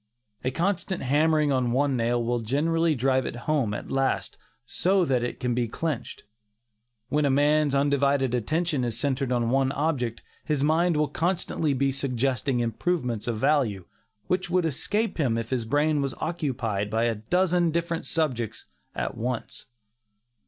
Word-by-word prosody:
A 130 - +1
constant 180 +5 -1
hammering 150 +2 +3
on 125 -3 +1
one 140 +1 +2
nail 120 0 +1
will 120 +1 0
generally 155 +7 +1
drive 130 +1 +1
it - - -5
home 145 -8 +1
at 105 - -5
last, 135 0 0 0.3
so 185 +8 +2
that 130 -5 +1
it 120 - -4
can 125 -1 0
be 120 0 0
clinched. 145 +1 -4 0.9
When 150 0 +1
a 140 - +3
man's 145 +1 +3
undivided 140 -2 +2
attention 150 +4 0
is 115 -2 -2
centred 135 0 -1
on 120 -1 +1
one 135 0 +2
object, 135 -6 -1 0.2
his 150 -3 0
mind 160 +2 +2
will 150 0 +2
constantly 160 -2 -1
be 135 +1 +1
suggesting 135 -1 0
improvements 120 0 -1
of 115 -2 -1
value, 110 - +1 0.4
which 185 -1 -1
would 180 -1 +2
escape 205 - -1
him 120 -6 +1
if 115 +1 -4
his 125 -3 -1
brain 145 +4 +2
was 135 -1 -2
occupied 125 - -2
by 110 +2 0
a 120 -1 +2
dozen 175 - +1
different 170 0 -2
subjects 125 -9 -1 0.3
at - - -3
once. 120 0 -4
140 Hz, 160 wpm, -26 LUFS, 120-155 Hz, 0.9 s, hammering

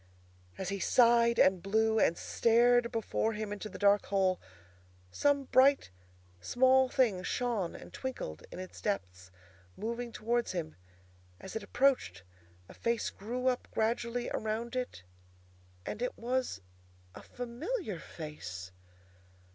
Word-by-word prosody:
As 190 - -3
he 200 0 -3
sighed 235 +1 +4
and 185 -2 +4
blew 220 +3 +2
and 170 - +3
stared 240 +1 +3
before 225 -1 -1
him 210 -1 -4
into 210 +1 -6
the - - -9
dark 205 0 +3
hole, 190 -2 +1 0.7
some 285 - +2
bright 270 - +4 0.5
small 260 - +4
thing 235 -9 +2
shone 215 -3 -1
and - - -11
twinkled 165 - -5
in - - -8
its 185 0 -8
depths, 95 - -3 0.5
moving 235 +3 -4
towards 235 0 -1
him. 160 -3 -4 0.6
As 190 - -9
it 220 - -2
approached, 220 - +1 0.4
a - - -12
face 235 -1 -1
grew 245 +5 -5
up 255 -1 +1
gradually 235 +2 -1
around 225 +3 -3
it, 250 - -4 0.8
and 215 - -5
it 250 - -2
was 250 - -2 0.5
a - - -10
familiar 245 - -4
face! 95 - -8
225 Hz, 130 wpm, -32 LUFS, 190-245 Hz, 0.8 s, sighed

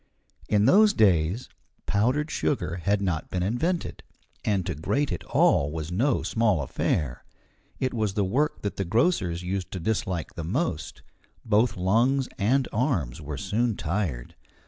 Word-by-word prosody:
In 105 -1 +3
those 210 - +6
days 95 - +2 0.4
powdered 125 +10 +1
sugar 80 +2 -1
had 100 +3 0
not 85 -5 -2
been 90 -1 -1
invented, 160 - -1 0.4
and 100 -4 0
to - - -2
grate 135 - -1
it 90 - -4
all 70 +1 +3
was 80 +1 -5
no 120 +9 +1
small 105 -9 +1
affair. 65 0 -1 0.6
It 130 -1 -1
was 110 -4 -1
the 100 - +1
work 140 +10 0
that 100 - -3
the 100 - 0
grocers 90 - +1
used 95 0 -3
to 95 - -3
dislike 90 -2 -2
the 85 - -6
most; 90 - -3 0.4
both 110 0 +2
lungs 120 +9 +2
and 125 +6 +2
arms 95 - -1
were 75 -1 -5
soon 110 +6 0
tired. 80 -9 -3
100 Hz, 150 wpm, -26 LUFS, 85-120 Hz, 0.6 s, those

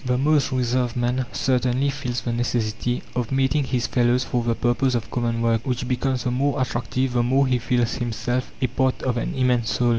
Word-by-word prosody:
The 125 -1 0
most 145 +1 +2
reserved 125 -1 0
man 125 +1 0
certainly 130 +1 +1
feels 125 -4 -3
the 120 - -2
necessity 120 0 -1
of 125 -1 -2
meeting 135 +2 +2
his 125 -2 -1
fellows 125 0 +2
for 120 -2 -1
the 115 -1 0
purpose 120 +2 +1
of 115 -4 -3
common 115 -1 -1
work, 115 -1 +2
which 125 -1 -2
becomes 130 0 -1
the 125 - 0
more 135 +3 0
attractive 130 0 -1
the 120 - +2
more 130 +3 +3
he 130 -2 +1
feels 120 -1 0
himself 120 +1 -2
a - - +5
part 130 +1 0
of 125 -2 0
an - - -2
immense 125 -3 +1
whole. 120 -1 +2
125 Hz, 205 wpm, -23 LUFS, 120-130 Hz, -, a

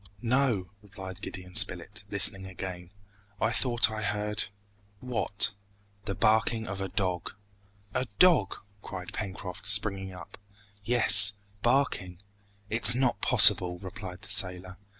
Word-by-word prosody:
"No," 120 -7 -1
replied 95 -2 -11
Gideon 90 -1 -9
Spilett, - - 0
listening 95 0 +6
again, 90 -1 -9 0.5
"I - - -1
thought 120 -3 0
I 110 0 -6
heard 105 0 -3 0.3
" 100 0 -37
"What?" 110 -5 0 0.5
"The 100 - -4
barking 110 +1 0
of 95 -1 -7
a 95 - -3
dog!" 90 -2 -4 0.6
"A 130 0 -3
dog!" 170 - +3 0.3
cried 90 -3 -9
Pencroft, 95 -3 -7
springing 100 -1 -1
up. 90 - -13 0.4
"Yes 100 -3 +7 0.3
barking 120 -8 -1 0.3
" 100 0 -36
"It's 115 +1 +4
not 125 -5 -1
possible!" 95 -7 +4
replied 95 0 -10
the 95 - -12
sailor. 90 -2 -2
100 Hz, 130 wpm, -27 LUFS, 95-110 Hz, 0.6 s, Yes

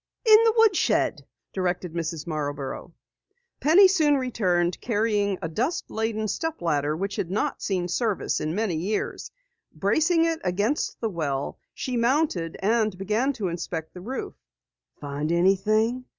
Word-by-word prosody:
"In 435 -1 +8
the 450 - +4
woodshed," 440 -5 +2 0.3
directed 180 -2 -2
Mrs. 165 -2 -3
Marborough. 145 -4 -4 0.7
Penny 350 +7 +7
soon 310 -6 +3
returned 185 -9 0
carrying 210 -3 0
a - - -1
dust 245 - -2
laden 220 -1 -1
step 325 +8 -3
ladder 150 -2 0
which 195 +3 -3
had 170 - -2
not 200 +3 -1
seen 185 -3 -1
service 215 +3 -1
in 155 +2 -2
many 210 -5 0
years. 195 +7 -3 0.5
Bracing 320 - +2
it 330 -1 0
against 205 +10 -1
the 225 - 0
well, 145 -6 -3 0.2
she 255 -2 -3
mounted 235 - +1
and 215 -2 +1
began 215 +8 0
to 215 -7 -3
inspect 165 -2 -5
the 180 - -9
roof. 255 +8 -5 0.7
"Find 145 +2 -3
anything?" 215 +7 +2
205 Hz, 140 wpm, -25 LUFS, 170-250 Hz, 0.7 s, In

